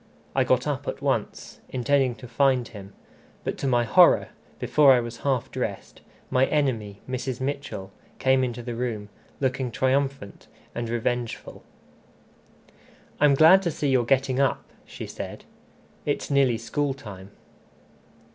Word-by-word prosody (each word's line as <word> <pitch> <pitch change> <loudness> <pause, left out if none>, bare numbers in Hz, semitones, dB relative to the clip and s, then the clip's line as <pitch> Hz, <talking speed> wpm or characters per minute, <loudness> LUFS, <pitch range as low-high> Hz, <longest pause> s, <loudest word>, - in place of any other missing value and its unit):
I - - +4
got - - +2
up - - -3
at - - -3
once, - - -2
intending 130 0 +1
to 125 - -11
find 130 0 +2
him; 100 -2 -11 0.5
but, - - -2
to 140 - -1
my 120 -2 +3
horror, 110 -2 +5 0.3
before 145 -3 +5
I 125 - +4
was 120 0 -5
half 130 -2 -1
dressed, 105 -6 -5 0.3
my 130 +1 +3
enemy, 115 -9 -1
Mrs. 130 -1 -3
Mitchell, 130 -8 -4 0.3
came 130 0 +3
into 120 -1 -3
the 120 0 -4
room, 115 -4 -3 0.3
looking 130 -1 -1
triumphant 130 -3 -1 0.3
and 120 -1 -4
revengeful. 120 0 -3 1.6
"I'm 145 -1 +5
glad 160 +6 +7
to 180 - -1
see 150 -3 -2
you're 130 -2 +3
getting 130 +1 +1
up," 140 -2 +1 0.2
she - - -8
said; - - -8 0.6
"it's - - -2
nearly 135 -4 +3
school 135 +4 -2
time." 100 -7 -10
130 Hz, 140 wpm, -25 LUFS, 115-135 Hz, 1.6 s, glad